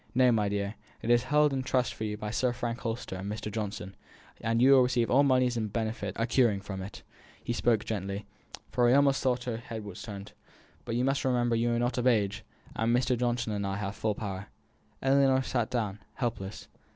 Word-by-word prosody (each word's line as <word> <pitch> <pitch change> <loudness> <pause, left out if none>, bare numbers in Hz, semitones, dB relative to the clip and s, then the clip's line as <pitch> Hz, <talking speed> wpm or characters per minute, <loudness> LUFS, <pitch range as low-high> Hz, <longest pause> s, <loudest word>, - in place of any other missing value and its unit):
"No, 125 -1 +5
my 105 -3 +2
dear. 100 0 -2 0.3
It 115 - +1
is 120 +1 +4
held 150 +1 +3
in 135 - 0
trust 130 -1 0
for 110 - -4
you 105 0 -3
by 105 0 -4
Sir 125 +2 +1
Frank 120 -1 -3
Holster 115 -4 -4
and 100 +2 -4
Mr. 105 0 -4
Johnson; 100 -3 -4 0.5
you 115 +3 +4
to 135 - +8
receive 125 -2 +1
all 135 - +6
moneys 130 -3 +3
and 110 -2 -2
benefits 110 -4 -3
accruing 115 -3 +3
from 95 -1 -6
it" 100 +2 -8 0.4
he 120 - -2
spoke 115 -2 +2
gently, 100 -1 -3 0.5
for 120 -1 +3
he 125 - +5
almost 140 -1 +4
thought 125 -2 +1
her 120 -2 -3
head 115 -2 -7
was 100 -3 -8
turned 100 -2 -8 0.5
"but 115 - -2
you 125 +2 +1
remember 125 -4 +1
you 120 +1 +1
are - - +1
not 120 +1 0
of 125 - +1
age, 105 -3 +2 0.3
and 115 +1 +2
Mr. 125 0 +1
Johnson 120 -2 -1
and 100 -1 -2
I 95 - -2
have 100 0 -4
full 110 -2 -1
power." 100 -2 -5 0.6
Ellinor 135 -1 +4
sat 120 -3 -1
down, 105 -5 -2 0.2
helpless. 115 -5 -4
115 Hz, 205 wpm, -29 LUFS, 105-125 Hz, 0.6 s, to